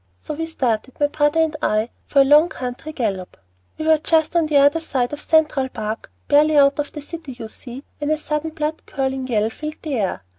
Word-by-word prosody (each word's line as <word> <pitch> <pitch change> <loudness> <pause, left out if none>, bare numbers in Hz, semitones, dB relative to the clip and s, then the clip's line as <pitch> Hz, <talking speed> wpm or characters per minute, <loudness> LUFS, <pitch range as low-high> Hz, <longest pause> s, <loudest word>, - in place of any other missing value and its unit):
So 90 - -6
we 325 +2 -3
started, 255 -5 -2
my 290 0 +2
brother 295 +2 +2
and 320 -1 0
I, 215 -1 +1 0.2
for 280 - +4
a - - +5
long 300 +5 +6
country 250 +5 -6
gallop. 200 -10 -3 0.4
"We 310 - -4
were 315 -1 +4
just 320 +1 +1
on 330 -2 +3
the 300 -2 +3
other 285 +3 +5
side 265 -5 -2
of 295 - -5
Central 305 -4 +2
Park, 220 -2 -5 0.2
barely 300 +1 +4
out 280 0 +5
of 295 - -2
the 295 - -8
city, 315 -3 -8
you 235 -2 -8
see, 245 +4 -9 0.2
when 295 0 -2
a 310 - +2
sudden 300 +1 -3
blood 310 0 -3
curdling 265 -1 -2
yell 220 -2 +1
filled 305 +5 -7
the 285 -6 -2
air. 185 - -2
290 Hz, 220 wpm, -21 LUFS, 250-310 Hz, 0.4 s, long